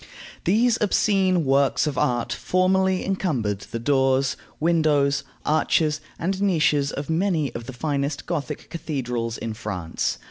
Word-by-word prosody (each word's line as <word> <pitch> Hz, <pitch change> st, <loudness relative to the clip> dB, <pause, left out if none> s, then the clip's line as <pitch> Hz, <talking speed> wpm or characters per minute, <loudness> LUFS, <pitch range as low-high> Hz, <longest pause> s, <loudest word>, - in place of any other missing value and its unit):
These 230 Hz, +6 st, +3 dB
obscene 190 Hz, -4 st, +2 dB
works 140 Hz, +2 st, +3 dB
of 150 Hz, -3 st, -2 dB
art 120 Hz, -2 st, 0 dB
formerly 185 Hz, 0 st, +1 dB
encumbered 135 Hz, -, -1 dB
the 115 Hz, -, -6 dB
doors, 135 Hz, +1 st, +2 dB, 0.2 s
windows, 150 Hz, -4 st, +2 dB, 0.2 s
arches, 155 Hz, 0 st, +2 dB, 0.2 s
and 190 Hz, +3 st, -2 dB
niches 155 Hz, -7 st, +2 dB
of 140 Hz, 0 st, -5 dB
many 160 Hz, -5 st, 0 dB
of 115 Hz, 0 st, -7 dB
the 130 Hz, -, -6 dB
finest 140 Hz, +2 st, -2 dB
Gothic 155 Hz, -3 st, -4 dB
cathedrals 125 Hz, -8 st, -3 dB
in 115 Hz, -1 st, -4 dB
France. 100 Hz, -7 st, -3 dB
150 Hz, 130 wpm, -24 LUFS, 130-180 Hz, 0.2 s, These